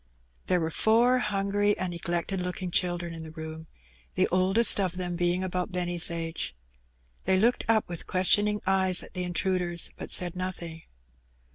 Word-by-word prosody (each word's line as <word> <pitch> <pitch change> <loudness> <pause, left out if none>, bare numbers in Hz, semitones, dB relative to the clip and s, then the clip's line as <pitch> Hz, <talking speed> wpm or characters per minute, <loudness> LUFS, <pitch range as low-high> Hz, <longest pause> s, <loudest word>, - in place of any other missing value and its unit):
There 180 - +2
were 160 -1 -2
four 235 +7 +3
hungry 205 -1 0
and 185 -1 -3
neglected 175 +2 -3
looking 180 0 -4
children 175 -1 -1
in 165 - -8
the 160 - -9
room, 160 0 -9 0.5
the - - +2
oldest 190 +5 +4
of 185 -2 -1
them 180 -1 -4
being 175 +1 0
about 180 -1 -3
Benny's 175 -1 +2
age. 165 - -4 0.7
They 190 - +2
looked 235 +4 +2
up 220 -1 +2
with 170 -2 -8
questioning 205 +3 +3
eyes 190 -1 +3
at - - -14
the 180 - -4
intruders, 180 -1 0
but - - -8
said 175 -1 +3
nothing. 175 -3 -6
180 Hz, 160 wpm, -27 LUFS, 175-195 Hz, 0.7 s, oldest